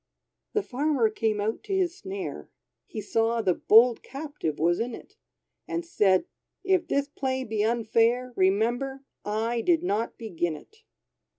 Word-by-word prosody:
The 420 - +1
Farmer 270 - +1
came 215 -1 0
out 215 +2 -2
to 395 - -1
his 355 -3 +1
snare, 390 -1 -6 0.4
He 215 - -5
saw 225 +2 0
the 185 - +3
bold 230 +6 +5
captive 275 - -5
was 170 +2 +2
in 235 0 -2
it; 405 - -14 0.5
And 340 0 -3
said, 205 - +3 0.4
"If 375 -2 +2
this 280 0 0
play 260 -2 -2
be 215 -3 -1
unfair, 235 +2 +1
Remember, 240 +8 +1 0.2
I 225 +3 -1
did 340 -1 +3
not 225 - -1
begin 175 -7 -2
it!" 435 - -15
235 Hz, 150 wpm, -27 LUFS, 215-290 Hz, 0.5 s, bold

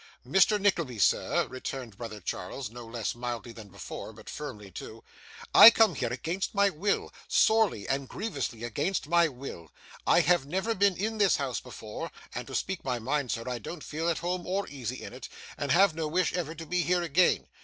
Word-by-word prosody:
'Mr. 190 +9 +4
Nickleby, 170 - +1
sir,' 100 - +2
returned 130 -3 -6
brother 110 -1 -7
Charles: 105 +6 -5
no 120 0 -9
less 115 -2 -3
mildly 120 -1 -5
than 110 -2 -11
before, 100 +2 -8
but 110 0 -11
firmly 105 -10 -7
too: - - -9 0.5
'I - - +12
come 225 -4 +4
here 125 -5 -2
against 165 - -3
my 200 0 +4
will, 195 +5 -1
sorely 220 - +3
and 135 -1 -1
grievously 140 - -4
against 145 - -1
my 170 +1 +4
will. 125 - -9 0.4
I - - +6
have 175 -5 +3
never 190 +8 -1
been 200 -2 +2
in 220 +3 -2
this 200 -3 +5
house 135 -3 -2
before; 110 -4 -7 0.2
and, - - -5
to - - -6
speak 190 -1 -2
my 125 -2 -1
mind, 135 +3 -1
sir, 115 - -2
I 125 -1 -3
don't 155 +8 -7
feel 160 +3 -2
at 165 - 0
home 175 +1 -3
or 195 +2 -1
easy 130 -3 -5
in - - -8
it, 125 -1 -9 0.3
and 145 -2 -2
have 190 +2 +5
no 160 -1 -2
wish 180 +4 +1
ever 165 -3 -3
to 165 +1 -8
be 180 +2 0
here 175 +1 +1
again. 170 +2 +3
145 Hz, 195 wpm, -29 LUFS, 120-180 Hz, 0.5 s, I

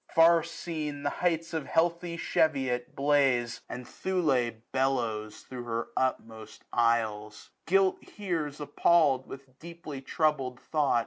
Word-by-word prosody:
Far 165 0 +7
seen, 150 -3 -5
the 145 - 0
heights 165 -1 0
of 160 -3 -3
heathy 170 +1 0
Cheviot 130 -7 0
blaze. 135 -4 +2
And 125 0 -7
Thule 155 -11 0 0.2
bellows 120 -5 -1
thro' 125 -2 -8
her 115 0 -2
utmost 110 -4 -3
isles. 110 -3 0 0.2
Guilt 190 +2 +3
hears 165 -8 -4
appall'd, 145 -2 +3
with 135 -1 -12
deeply 165 -4 -8
troubled 135 -4 0
thought. 150 -6 +1
140 Hz, 120 wpm, -29 LUFS, 125-165 Hz, 0.2 s, Far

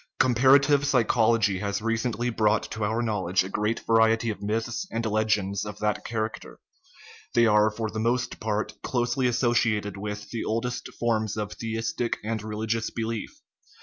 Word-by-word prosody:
Comparative 135 +3 +5
psychology 115 -6 +3
has 100 0 -2
recently 115 +2 -1
brought 110 -1 +2
to 110 - -3
our 110 +3 0
knowledge 95 -5 +1
a 95 - -6
great 105 +3 -1
variety 115 0 +3
of 105 - -8
myths 115 - -2
and 115 0 -3
legends 105 -2 0
of 105 -1 -6
that 105 0 -1
character; 110 -1 -4 0.8
they 120 0 +5
are, 105 -1 +5
for 110 +1 -3
the 110 - -4
most 120 +2 0
part, 110 -1 -2
closely 125 +1 0
associated 115 -4 +1
with 105 +1 -6
the 115 - -3
oldest 120 +3 -2
forms 110 -2 0
of 105 -1 -3
theistic 115 +1 -2
and 110 0 -2
religious 110 +1 -2
belief. 115 -1 -3
110 Hz, 150 wpm, -26 LUFS, 105-115 Hz, 0.8 s, Comparative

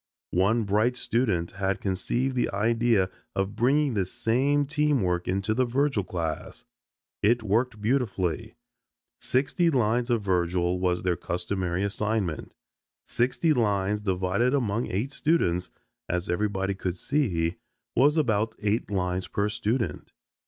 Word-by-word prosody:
One 100 +6 +3
bright 110 +5 +2
student 105 -11 0
had 95 0 -1
conceived 120 +7 -1
the 125 - +1
idea 110 -2 +2 0.2
of 95 +2 -1
bringing 135 +4 +2
this 95 -4 -1
same 130 +5 +1
team 150 -4 +1
work 90 -1 -1
into 100 +4 0
the 130 - +2
Virgil 130 -2 +1
class. 85 -3 -4 0.6
It 115 +3 +3
worked 110 +2 0
beautifully. 105 - -1 0.6
Sixty 150 +7 +1
lines 120 -3 +1
of 115 -3 +1
Virgil 90 -1 +1
was 90 -1 0
their 90 -1 +1
customary 90 +1 -2
assignment. 100 -4 -2 0.5
Sixty 130 +6 +1
lines 105 -4 +1
divided 95 +6 +1
among 115 -3 0
eight 110 +9 -2
students, 115 - +1 0.4
as 90 0 -1
everybody 95 0 0
could 95 -2 -3
see, 90 - 0 0.4
was 145 +5 +4
about 110 -6 +1
eight 105 +2 0
lines 90 -2 -1
per 100 +1 -1
student. 110 +3 -2
105 Hz, 130 wpm, -27 LUFS, 95-125 Hz, 0.6 s, was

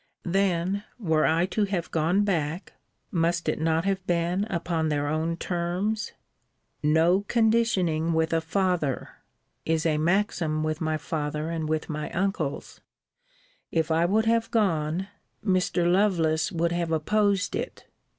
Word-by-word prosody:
Then 190 +1 +1
were 160 -9 +2
I 165 +2 +3
to 205 +2 0
have 195 -4 -3
gone 170 +5 +2
back, 170 -3 -2 0.4
must 170 -2 0
it 155 - 0
not 160 +1 +1
have 195 -1 0
been 175 +3 +1
upon 170 -5 -1
their 145 -1 0
own 160 +2 -1
terms? 180 +6 -2 0.7
No 160 +5 +3
conditioning 220 -9 +2
with 160 0 +1
a 165 - +2
father! 165 -5 -1 0.5
is 160 0 0
a 155 -2 +2
maxim 165 -3 +1
with 155 +1 -2
my 155 -1 0
father, 150 +1 -3
and 160 -2 -3
with 155 -1 -1
my 150 -1 -4
uncles. 180 -6 -2 0.9
If 160 -1 0
I 165 +1 +3
would 215 +5 +2
have 230 0 +2
gone, 175 -4 0 0.4
Mr. 185 -2 +1
Lovelace 175 -4 +2
would 170 -1 0
have 170 -1 -1
opposed 200 +4 +1
it. - - -5
170 Hz, 140 wpm, -26 LUFS, 160-195 Hz, 0.9 s, I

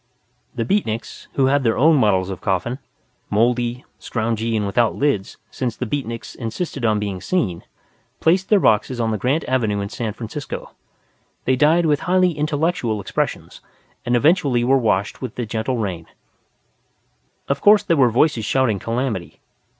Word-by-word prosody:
The 115 - -1
Beatniks, 115 - -2
who 135 - +2
had 140 +1 +2
their 115 -2 +1
own 160 +4 +5
models 95 -7 +2
of 95 - -7
coffin 110 +7 -1 0.5
mouldy, 120 +3 +1
scroungy, 115 -1 -1
and 105 - -1
without 110 +3 +1
lids, 140 -10 -1
since 120 -4 -3
the 125 - -4
Beatniks 115 -2 -4
insisted 130 +4 -5
on 110 -2 +2
being 100 -3 -3
seen 105 - -1 0.6
placed 180 +3 +2
their 210 - +5
boxes 110 - +2
on 115 -1 0
the 110 - -2
Grant 135 +8 0
Avenue 115 -6 0
in 100 0 -3
San 110 -1 -4
Francisco. 120 +5 -7 0.7
They 130 - +3
died 155 +6 +3
with 150 -2 +2
highly 185 0 +2
intellectual 150 - -1
expressions, 95 - -3 0.4
and 120 - +1
eventually 140 -3 +3
were 130 +3 +4
washed 105 -4 0
by 130 - -3
the 120 - -3
gentle 115 +3 -2
rain. 90 -7 -4 1.4
Of 140 0 -1
course 210 0 +6
there 170 - +2
were 130 -5 +4
voices 125 0 +2
shouting 115 -3 +1
calamity. 115 -4 -3
120 Hz, 160 wpm, -21 LUFS, 110-145 Hz, 1.4 s, course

